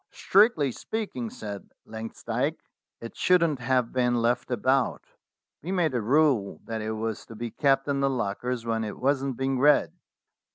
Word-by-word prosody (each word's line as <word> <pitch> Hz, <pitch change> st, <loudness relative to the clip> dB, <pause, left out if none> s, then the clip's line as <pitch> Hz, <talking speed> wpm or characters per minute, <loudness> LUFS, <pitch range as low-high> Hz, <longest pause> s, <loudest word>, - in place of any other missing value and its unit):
"Strictly 195 Hz, -, +3 dB
speaking," 160 Hz, -, -4 dB
said 100 Hz, -2 st, -8 dB, 0.2 s
Langsdyke, 115 Hz, +6 st, -3 dB, 0.4 s
"it 115 Hz, -, -8 dB
shouldn't 170 Hz, -6 st, +3 dB
have 125 Hz, -1 st, 0 dB
been 125 Hz, -1 st, +2 dB
left 120 Hz, +1 st, 0 dB
about. 130 Hz, +2 st, +1 dB, 0.6 s
We 175 Hz, -, -5 dB
made 175 Hz, -7 st, +1 dB
a 120 Hz, -, 0 dB
rule 130 Hz, -3 st, +2 dB
that 110 Hz, -1 st, -4 dB
it 110 Hz, +1 st, -3 dB
was 110 Hz, 0 st, -3 dB
to 115 Hz, -, -10 dB
be 115 Hz, +1 st, -5 dB
kept 135 Hz, +1 st, +2 dB
in 140 Hz, -1 st, 0 dB
the 140 Hz, 0 st, +2 dB
lockers 120 Hz, 0 st, -2 dB
when 115 Hz, -1 st, -1 dB
it 105 Hz, -, -5 dB
wasn't 135 Hz, -1 st, 0 dB
being 135 Hz, -1 st, -1 dB
read." 145 Hz, +2 st, +4 dB
125 Hz, 160 wpm, -27 LUFS, 115-140 Hz, 0.6 s, read